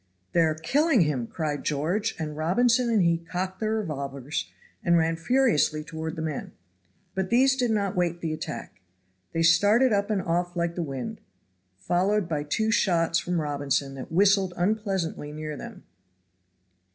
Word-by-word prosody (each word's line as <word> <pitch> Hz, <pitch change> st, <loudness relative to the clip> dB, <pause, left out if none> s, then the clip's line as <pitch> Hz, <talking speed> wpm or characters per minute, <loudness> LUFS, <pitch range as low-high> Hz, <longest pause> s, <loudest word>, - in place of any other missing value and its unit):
"They -, -, +2 dB
are 160 Hz, -1 st, +2 dB
killing 275 Hz, -, +2 dB
him!" 140 Hz, -7 st, 0 dB
cried 150 Hz, -1 st, -3 dB
George; 175 Hz, +10 st, -1 dB
and 155 Hz, -3 st, -4 dB
Robinson 230 Hz, +10 st, +2 dB
and 220 Hz, -5 st, +3 dB
he 170 Hz, -1 st, +2 dB
cocked 185 Hz, +3 st, -4 dB
their 220 Hz, 0 st, 0 dB
revolvers 140 Hz, -, -4 dB, 0.3 s
and 170 Hz, 0 st, +4 dB
ran 165 Hz, 0 st, +2 dB
furiously 165 Hz, -, +2 dB
toward 160 Hz, 0 st, -5 dB
the 160 Hz, -, -4 dB
men. 155 Hz, -3 st, -4 dB, 0.6 s
But 190 Hz, -1 st, -2 dB
these 260 Hz, +3 st, +4 dB
did 250 Hz, -3 st, 0 dB
not 205 Hz, -2 st, 0 dB
wait 175 Hz, -1 st, 0 dB
the 160 Hz, -2 st, -2 dB
attack. 120 Hz, -9 st, -7 dB, 0.5 s
They 165 Hz, -, 0 dB
started 205 Hz, +9 st, +5 dB
up 200 Hz, +1 st, +1 dB
and 210 Hz, -2 st, +1 dB
off 175 Hz, +1 st, -1 dB
like 170 Hz, -1 st, -1 dB
the 175 Hz, -, -3 dB
wind, 135 Hz, -5 st, -5 dB, 0.6 s
followed 180 Hz, -, +1 dB
by 155 Hz, -4 st, -1 dB
two 220 Hz, +10 st, 0 dB
shots 165 Hz, -6 st, +2 dB
from 175 Hz, -1 st, -1 dB
Robinson 140 Hz, -2 st, -1 dB
that 135 Hz, +2 st, -8 dB
whistled 190 Hz, 0 st, +3 dB
unpleasantly 190 Hz, -6 st, -1 dB
near 155 Hz, 0 st, -5 dB
them. -, -, -9 dB
170 Hz, 160 wpm, -26 LUFS, 155-205 Hz, 0.6 s, started